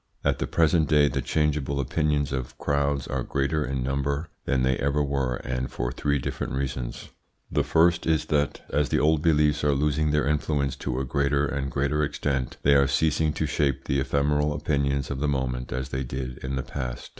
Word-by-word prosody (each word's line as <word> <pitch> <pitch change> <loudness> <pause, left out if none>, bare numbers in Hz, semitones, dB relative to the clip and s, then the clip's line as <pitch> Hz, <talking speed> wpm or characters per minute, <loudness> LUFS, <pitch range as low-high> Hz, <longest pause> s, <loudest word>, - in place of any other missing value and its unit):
At - - +1
the - - -1
present 80 -2 +2
day 75 -1 +5
the 70 -2 -1
changeable 70 0 0
opinions 75 0 0
of 65 -2 -4
crowds 70 -2 0
are 65 0 -2
greater 70 +4 0
in 65 -2 -2
number 70 +4 -1 0.2
than 65 -2 +1
they 65 0 +2
ever 70 +1 +1
were, 70 -3 0
and 65 0 -3
for - - -2
three 70 +3 0
different 65 - -4
reasons. 65 -3 -4 0.4
The - - +2
first 85 +1 +3
is 80 -2 +2
that 75 -2 0
as 75 0 +2
the - - +2
old 80 0 +3
beliefs 75 -2 +3
are 75 -1 +3
losing 75 +2 +1
their 75 -2 +2
influence 75 -2 0
to 65 - -3
a 65 - -2
greater 70 +1 +1
and 70 -1 -2
greater 70 +3 0
extent, 70 -3 -2
they 70 - +5
are 70 -1 +5
ceasing 80 +2 +2
to 80 - -1
shape 70 -2 0
the 70 - 0
ephemeral 75 +2 +1
opinions 70 -2 -1
of 70 - -3
the 75 - 0
moment 65 -3 -2
as 65 +1 -3
they 65 0 -2
did 65 0 -5
in 65 +1 -4
the 65 - -2
past. 60 -1 -5
70 Hz, 200 wpm, -26 LUFS, 65-75 Hz, 0.4 s, day